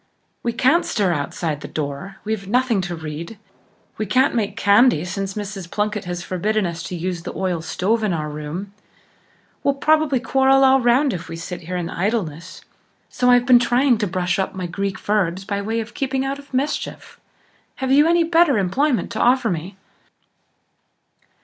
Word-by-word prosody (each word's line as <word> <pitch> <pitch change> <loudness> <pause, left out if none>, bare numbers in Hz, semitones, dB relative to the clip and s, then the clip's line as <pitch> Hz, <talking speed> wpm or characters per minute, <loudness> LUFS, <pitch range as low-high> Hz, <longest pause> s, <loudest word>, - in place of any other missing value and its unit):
We 235 - -1
can't 260 +8 +3
stir 195 -5 0
outside 150 +1 -3
the - - -7
door; 150 +6 -5
we've 215 -2 -3
nothing 240 -2 +2
to 175 -1 -4
read; 160 +5 -7 0.6
we 215 - -2
can't 255 +6 +3
make 210 -3 -1
candy 205 - +4
since 195 +2 -4
Mrs. 200 -4 -6
Plunkett 210 0 -2
has 175 0 -4
forbidden 210 +4 -1
us 170 -1 -4
to 180 - -5
use 175 0 -3
the - - -7
oil 185 -3 -1
stove 200 +7 -1
in 210 - +1
our 155 -3 -2
room; 150 +7 -6 0.9
we'll 280 - +1
probably 305 -2 +2
quarrel 270 +2 +3
all 265 0 +5
round 250 +3 +3
if 175 -2 -6
we 165 - -5
sit 175 +2 -6
here 180 +2 -4
in 175 -1 -3
idleness; 180 -4 -3 0.5
so 250 0 +1
I've 245 0 +5
been 250 -2 +7
trying 245 0 +2
to 210 - 0
brush 180 0 -1
up 190 - -2
my 185 -1 -4
Greek 195 +2 -3
verbs 195 -3 -1
by 200 0 -2
way 220 +3 -2
of 225 +1 -6
keeping 265 -1 -1
out 275 +1 -3
of 285 - -15
mischief. 275 +3 -3 0.6
Have 265 -1 -2
you 290 +3 +6
any 340 0 +4
better 330 -5 +4
employment 240 +9 0
to 220 - -4
offer 245 -2 +3
me?" 175 +4 -5
205 Hz, 180 wpm, -21 LUFS, 180-255 Hz, 0.9 s, been